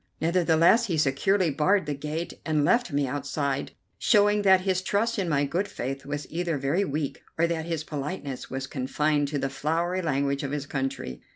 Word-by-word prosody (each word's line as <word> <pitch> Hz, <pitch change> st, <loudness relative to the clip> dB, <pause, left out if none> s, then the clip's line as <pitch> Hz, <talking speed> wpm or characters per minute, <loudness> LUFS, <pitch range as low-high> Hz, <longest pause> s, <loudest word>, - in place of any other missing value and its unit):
Nevertheless 170 Hz, +6 st, +4 dB
he 170 Hz, -5 st, 0 dB
securely 155 Hz, +5 st, +2 dB
barred 185 Hz, +7 st, +2 dB
the 150 Hz, -, -2 dB
gate 150 Hz, +4 st, -4 dB
and 155 Hz, -2 st, +1 dB
left 240 Hz, -2 st, +2 dB
me 145 Hz, 0 st, +1 dB
outside, 140 Hz, +1 st, -2 dB, 0.3 s
showing 205 Hz, -1 st, +4 dB
that 190 Hz, -2 st, +5 dB
his 185 Hz, -1 st, 0 dB
trust 210 Hz, +4 st, 0 dB
in 185 Hz, -3 st, -1 dB
my 145 Hz, -2 st, +2 dB
good 175 Hz, +8 st, -1 dB
faith 135 Hz, -5 st, -5 dB
was 145 Hz, 0 st, -3 dB
either 170 Hz, -1 st, -1 dB
very 145 Hz, +8 st, +1 dB
weak, 150 Hz, -5 st, -3 dB, 0.2 s
or 165 Hz, -, +3 dB
that 165 Hz, -1 st, -2 dB
his 165 Hz, -2 st, -2 dB
politeness 145 Hz, -2 st, -5 dB
was 135 Hz, +1 st, -3 dB
confined 145 Hz, +2 st, 0 dB
to 145 Hz, +1 st, -2 dB
the 135 Hz, -, -1 dB
flowery 165 Hz, +6 st, -1 dB
language 140 Hz, -3 st, 0 dB
of 140 Hz, -, -3 dB
his 145 Hz, -1 st, -2 dB
country. 135 Hz, -, -4 dB
155 Hz, 185 wpm, -26 LUFS, 140-180 Hz, 0.3 s, that